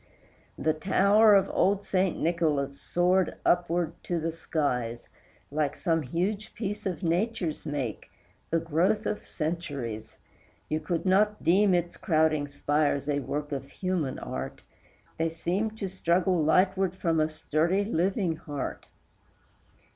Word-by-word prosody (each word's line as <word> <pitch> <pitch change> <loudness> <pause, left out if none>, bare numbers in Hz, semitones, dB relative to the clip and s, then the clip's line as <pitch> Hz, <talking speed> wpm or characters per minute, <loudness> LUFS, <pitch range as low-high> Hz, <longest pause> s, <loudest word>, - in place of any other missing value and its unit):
The 155 - +1
tower 200 +6 +5
of 195 -1 +4
old 200 +1 +1
Saint 185 -1 +1
Nicholas 150 -5 0
soared 180 +1 +2
upward 175 -1 +2
to 175 -1 -1
the 165 +1 -1
skies, 125 -8 -2 0.4
Like 150 -1 -1
some 165 -3 +1
huge 190 - -2
piece 205 -2 -3
of 185 0 -4
Nature's 175 -2 -1
make, 140 -7 -3 0.4
the 165 - +2
growth 170 +7 +1
of 210 - -3
centuries; 145 -10 -4 0.5
You 155 - 0
could 170 +1 -2
not 210 +3 +3
deem 190 +2 +4
its 175 0 -1
crowding 155 -3 +2
spires 145 0 0
a 145 -1 +1
work 145 +3 -4
of 135 -1 -4
human 180 -8 -2
art, - - -5 0.6
They 165 0 +2
seemed 190 +7 -2
to 200 - -3
struggle 180 -1 +1
lightward 185 +3 +3
from 165 -4 0
a 155 0 +2
sturdy 160 +5 0
living 185 -2 0
heart. 145 -4 -5
170 Hz, 130 wpm, -28 LUFS, 150-190 Hz, 0.6 s, tower